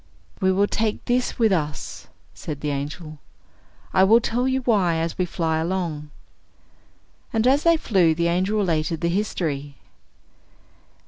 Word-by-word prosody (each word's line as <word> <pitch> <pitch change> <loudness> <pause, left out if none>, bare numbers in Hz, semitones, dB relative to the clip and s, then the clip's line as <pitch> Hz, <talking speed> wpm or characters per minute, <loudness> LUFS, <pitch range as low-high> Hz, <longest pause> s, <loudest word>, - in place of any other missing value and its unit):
"We 190 0 +2
will 195 +2 +3
take 215 +1 -2
this 245 +1 0
with 225 -3 +3
us," 150 -5 -3 0.3
said 150 -3 -7
the 150 - -1
angel, 150 +2 -5 0.7
"I 190 - +5
will 220 +4 +6
tell 240 +2 -1
you 265 0 0
why 200 -9 +2
as 165 0 -2
we 180 - 0
fly 165 -2 -1
along." 165 -3 -3 1.2
And 225 0 +1
as 270 +3 +4
they 335 0 +4
flew 185 - +2
the 170 +1 +1
angel 185 +5 0
related 165 -5 0
the 170 - +1
history. 155 -7 -2
180 Hz, 145 wpm, -23 LUFS, 160-215 Hz, 1.2 s, will